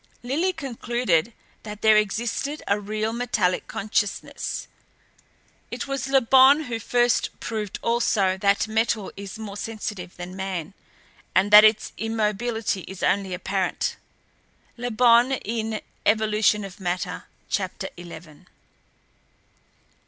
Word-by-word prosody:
"Lillie 305 +10 0
concluded 240 - -1 0.3
that 210 -1 -9
there 220 -1 +6
existed 235 +7 -1
a 200 +1 +2
real 215 +2 -2
metallic 230 -7 0
consciousness. 205 0 -2 1.0
It - - -5
was 275 -1 -3
Le 270 0 +4
Bon 265 +4 +6
who 240 -5 -4
first 240 +2 +2
proved 215 -3 -4
also 220 -5 +2
that 200 +2 +1
metal 220 -1 0
is 200 0 -8
more 210 -2 -7
sensitive 210 -5 -6
than 175 +1 -7
man, 190 -3 -4 0.6
and 195 +2 +3
that 210 0 +11
its 215 0 +3
immobility 225 -1 -1
is 190 -1 -8
only 195 -1 +1
apparent. 185 +1 -2 0.8
(Le 245 0 -4
Bon 240 +2 +5
in 225 -3 -3 0.2
'Evolution 215 -1 +2
of 195 +1 -11
Matter,' 180 -1 -3 0.2
Chapter 190 -1 -2
eleven.) 170 -3 -12
215 Hz, 115 wpm, -24 LUFS, 195-235 Hz, 1.0 s, that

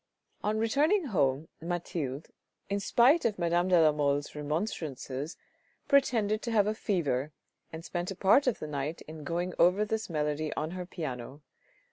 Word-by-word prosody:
On 210 +1 0
returning 295 - +2
home 140 -1 +1
Mathilde, 165 -4 -4 0.4
in 200 - +1
spite 250 - +4
of 215 -3 0
Madame 175 0 +1
de 180 -2 +5
la 155 -1 +6
Mole's 145 -1 0
remonstrances, 150 - -4 0.5
pretended 225 -6 +3
to - - -4
have 210 -3 +4
a 215 - +1
fever 155 - -1 0.4
and 160 +1 -8
spent 175 0 -3
a 195 - -4
part 205 +10 +4
of 250 - +2
the - - -6
night 150 +1 -4
in 155 0 -10
going 175 +4 -2
over 185 +5 +4
this 220 0 -3
melody 150 -1 -1
on 155 +2 -2
her 180 -1 -6
piano. 140 -5 -6
170 Hz, 160 wpm, -30 LUFS, 150-210 Hz, 0.5 s, la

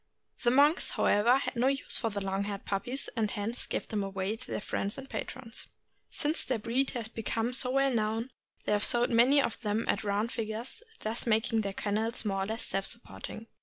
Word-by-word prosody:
The 240 - +4
monks, 285 +6 +5
however, 235 +5 +5
had 270 - -3
no 245 +2 +3
use 275 0 0
for 230 - 0
long 195 -1 -1
haired 200 -1 -5
puppies, 245 +7 -2
and 220 -3 +1
hence 215 +4 -3
gave - - -2
them 215 -3 -1
to 195 +2 -2
their - - -2
friends 200 0 -2
and 270 0 -7
patrons. 250 -4 -5 0.4
Since 300 +2 -1
the 255 - 0
breed 240 +5 +1
has 230 -2 -1
become 225 +1 -2
so 250 0 +5
well 275 0 +3
known, 225 +2 0 0.3
they - - 0
have 205 0 +3
sold 240 +1 +3
many 245 +5 +6
of 245 -4 0
them 215 0 0
at - - +1
round 210 +3 0
figures, 225 - -4 0.2
thus 225 +3 -3
making 225 0 +3
their 200 -2 -2
kennels 220 +4 -1
more 195 -2 0
or - - -6
less 220 +1 -2
self 195 0 -1
supporting. 230 -1 -8
225 Hz, 200 wpm, -31 LUFS, 210-250 Hz, 0.4 s, many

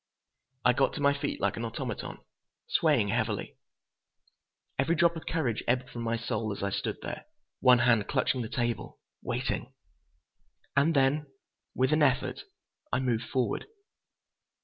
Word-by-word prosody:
I 125 - +6
got 135 +2 +2
to - - -5
my 140 0 +4
feet 140 0 -3
like 100 -1 0
an 115 - -3
automaton, 115 -1 -4 0.5
swaying 145 -11 +3
heavily. 110 -1 -1 1.2
Every 170 - +3
drop 170 +1 +4
of 165 - -8
courage 130 -9 0
ebbed 125 +1 +1
from 120 - -5
my 115 0 0
soul 110 -2 -2
as 100 - -5
I 100 - 0
stood - - -2
there, - - -5 0.3
one 125 -1 +7
hand 120 -3 +3
clutching 130 -1 +1
the 110 - -4
table, 120 -3 -2 0.2
waiting.... - - -2 1.0
And 145 +4 +4
then, 140 +2 +3 0.5
with 130 +4 +2
an 155 - +3
effort, 135 -3 +2 0.5
I - - +2
moved 120 -3 0
forward. 130 -3 -1
125 Hz, 150 wpm, -29 LUFS, 115-140 Hz, 1.2 s, one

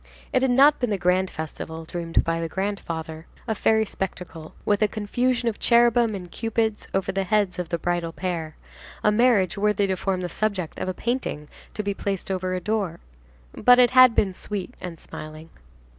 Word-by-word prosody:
It 255 - +3
had 265 - +2
not 275 +4 +5
been 245 - 0
the 205 - 0
grand 185 +1 +2
festival 160 +1 -6
dreamed 170 0 -1
by 165 0 -1
the 165 - -3
grandfather, 165 -5 -4 0.2
a 220 - +1
fairy 220 +1 +2
spectacle, 180 -5 -6
with 205 0 +2
a 215 - +5
confusion 240 +4 -1
of 225 - -1
cherubim 235 -2 +4
and 180 -3 -8
Cupids 225 -1 -1
over 195 -1 0
the 195 0 -1
heads 195 -2 +1
of 175 -2 -4
the 170 - -1
bridal 175 0 -1
pair, 165 -3 -4 0.5
a 210 - +4
marriage 210 -5 +3
worthy 210 -1 +2
to 190 -1 0
form 185 0 -2
the 180 - -2
subject 190 -2 -2
of - - -2
a 185 - -3
painting 235 - -3 0.3
to 210 - -2
be 200 0 -1
placed 195 -1 -3
over 185 -1 -1
a - - -1
door; 195 -3 -2 0.5
but 245 0 +5
it 245 -1 +5
had 255 -2 +7
been 190 -3 +2
sweet 205 +4 -5
and 175 -3 -7
smiling. 155 +1 -10
195 Hz, 190 wpm, -24 LUFS, 175-220 Hz, 0.5 s, had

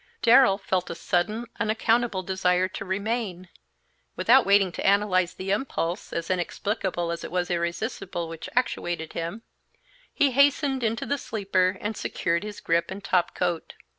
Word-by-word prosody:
Darrell 240 -4 +6
felt 190 -2 -1
a - - -4
sudden, 205 +7 -1
unaccountable 225 -2 +1
desire 185 -1 +1
to 185 - -7
remain. 195 -2 -3 0.7
Without 250 -1 +5
waiting 200 -2 +4
to - - -5
analyze 195 -3 +2
the 190 +1 -4
impulse, 200 -5 -2
as 170 +2 -3
inexplicable 185 -1 -2
as 170 - -5
it - - -5
was 180 0 -1
irresistible, 175 +1 -3
which 165 -1 -7
actuated 175 -9 -1
him, 170 +7 -4 0.7
he 280 -2 +2
hastened 280 0 +3
into 225 0 -1
the 285 0 -1
sleeper 190 -4 0
and 210 +1 -3
secured 170 -3 -1
his 210 -1 -7
grip 165 0 +1
and 195 +1 -7
top 180 -3 +1
coat. 175 -2 -2
190 Hz, 150 wpm, -26 LUFS, 175-220 Hz, 0.7 s, Darrell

